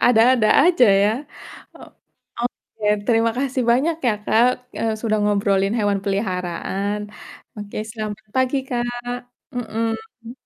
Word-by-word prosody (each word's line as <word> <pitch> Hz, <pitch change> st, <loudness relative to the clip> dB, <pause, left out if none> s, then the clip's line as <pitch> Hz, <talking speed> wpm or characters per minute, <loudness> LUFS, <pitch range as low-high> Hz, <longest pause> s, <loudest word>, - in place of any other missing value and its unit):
ada-ada 235 Hz, -1 st, +5 dB, 0.2 s
aja, 335 Hz, -10 st, +5 dB
ya. 205 Hz, +1 st, +3 dB, 0.6 s
O -, -, -16 dB, 0.6 s
oke, 230 Hz, -2 st, -5 dB, 0.2 s
terima 230 Hz, -1 st, +3 dB
kasih 265 Hz, -1 st, -1 dB
banyak 295 Hz, +7 st, +2 dB
ya -, -, +3 dB
Kak, 230 Hz, +4 st, +4 dB, 0.3 s
eee, 225 Hz, -1 st, 0 dB
sudah 215 Hz, -2 st, 0 dB
ngobrolin 200 Hz, -1 st, +1 dB
hewan 205 Hz, -2 st, +1 dB
peliharaan. 195 Hz, 0 st, -2 dB, 0.6 s
Oke, 205 Hz, -1 st, -8 dB
selamat 215 Hz, -1 st, -6 dB
pagi 260 Hz, +1 st, +2 dB
Kak. 245 Hz, 0 st, -3 dB, 0.3 s
Mhm. 225 Hz, 0 st, -4 dB
225 Hz, 115 wpm, -21 LUFS, 205-245 Hz, 0.6 s, ada-ada